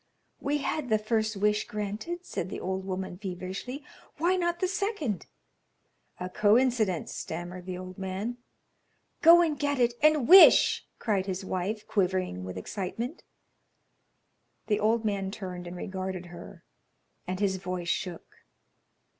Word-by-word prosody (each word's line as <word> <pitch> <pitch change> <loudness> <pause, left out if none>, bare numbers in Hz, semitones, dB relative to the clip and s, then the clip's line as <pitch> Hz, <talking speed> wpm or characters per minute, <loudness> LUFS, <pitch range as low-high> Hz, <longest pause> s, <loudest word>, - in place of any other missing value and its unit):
"We 285 +1 0
had 285 -1 -2
the 215 - +4
first 215 0 0
wish 210 +1 +1
granted," 215 - -4
said 180 - -4
the - - -5
old 190 +1 -3
woman, 185 -1 -4
feverishly; 195 +8 -5 0.3
"why 350 +4 +2
not 345 -1 0
the 370 - +1
second?" 370 - -2 0.9
"A 180 - -3
coincidence," 215 -2 +2
stammered 175 +2 -6
the 180 -1 -4
old 185 +1 -9
man. 195 +6 -3 0.8
"Go 340 +1 +8
and 305 -4 -1
get 285 0 0
it 240 -1 +3
and 305 -4 +4
wish," 375 +4 +8
cried 200 -4 0
his 190 0 -3
wife, 190 +4 -3
quivering 185 - 0
with 95 0 -6
excitement. 210 - -4 1.4
The 210 - +1
old 220 +1 +2
man 200 -2 -1
turned 180 -3 -6
and 175 +1 -7
regarded 185 -1 -4
her, 170 - -11 0.6
and 185 +1 -3
his 195 -2 +1
voice 180 -2 -4
shook. 175 0 -4
205 Hz, 140 wpm, -28 LUFS, 185-250 Hz, 1.4 s, Go